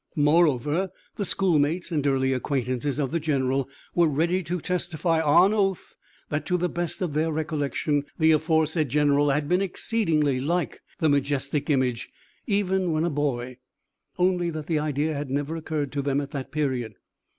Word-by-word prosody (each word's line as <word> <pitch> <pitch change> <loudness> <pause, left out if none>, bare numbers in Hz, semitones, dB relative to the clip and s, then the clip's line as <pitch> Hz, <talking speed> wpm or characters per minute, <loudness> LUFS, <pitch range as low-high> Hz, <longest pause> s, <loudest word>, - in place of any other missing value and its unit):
Moreover 150 +2 +2 0.3
the 200 - -2
schoolmates 170 -2 +1
and 145 -3 0
early 135 -1 +2
acquaintances 130 +1 -1
of 140 -3 -1
the 170 - 0
general 135 -3 0 0.2
were 170 -1 +4
ready 170 +5 +1
to 180 +1 -3
testify, 170 -1 0
on 175 +6 +5
oath, 195 -4 0 0.4
that, 150 0 -1
to 180 - +2
the 180 +1 0
best 175 +1 -3
of 165 -5 -2
their 160 +2 +1
recollection, 150 -2 -1
the 160 -1 +4
aforesaid 160 -1 +2
general 145 +1 +3
had 145 +1 0
been 180 +4 +2
exceedingly 165 - 0
like 165 -2 -1 0.2
the 160 - +1
majestic 140 +1 0
image, 130 -5 0 0.4
even 190 -4 +1
when 155 +1 +1
a 170 - 0
boy, 130 -4 -2 0.6
only 180 -1 +2
that 155 -2 -5
the 160 -1 0
idea 150 +1 -1
had 145 -1 -4
never 145 +4 -2
occurred 155 -4 -3
to 140 - -2
them 140 0 0
at 140 -1 -5
that 135 -2 -5
period. 130 -8 -2
150 Hz, 165 wpm, -25 LUFS, 140-170 Hz, 0.6 s, on